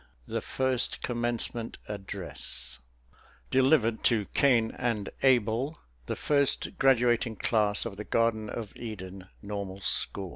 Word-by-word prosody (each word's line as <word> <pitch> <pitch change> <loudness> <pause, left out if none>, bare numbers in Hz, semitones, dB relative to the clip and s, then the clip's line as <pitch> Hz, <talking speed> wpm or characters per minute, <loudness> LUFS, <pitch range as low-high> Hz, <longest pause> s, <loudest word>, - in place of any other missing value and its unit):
THE - - -3
FIRST 130 -2 0
COMMENCEMENT 120 -1 -2
ADDRESS 95 -10 -5 0.7
(_Delivered 130 -4 +3
to 110 -4 +3
Cain 120 -5 +4
and 115 -5 -2
Abel, 125 +3 +2 0.3
the - - -2
first 140 -2 +1
graduating 120 -3 +3
class 105 -1 +2
of 105 -4 -5
the 105 - -4
Garden 110 -1 +1
of 110 -2 -6
Eden 95 -4 -7 0.2
Normal 100 -2 -5
School. 95 0 +1
115 Hz, 115 wpm, -29 LUFS, 100-125 Hz, 0.7 s, Cain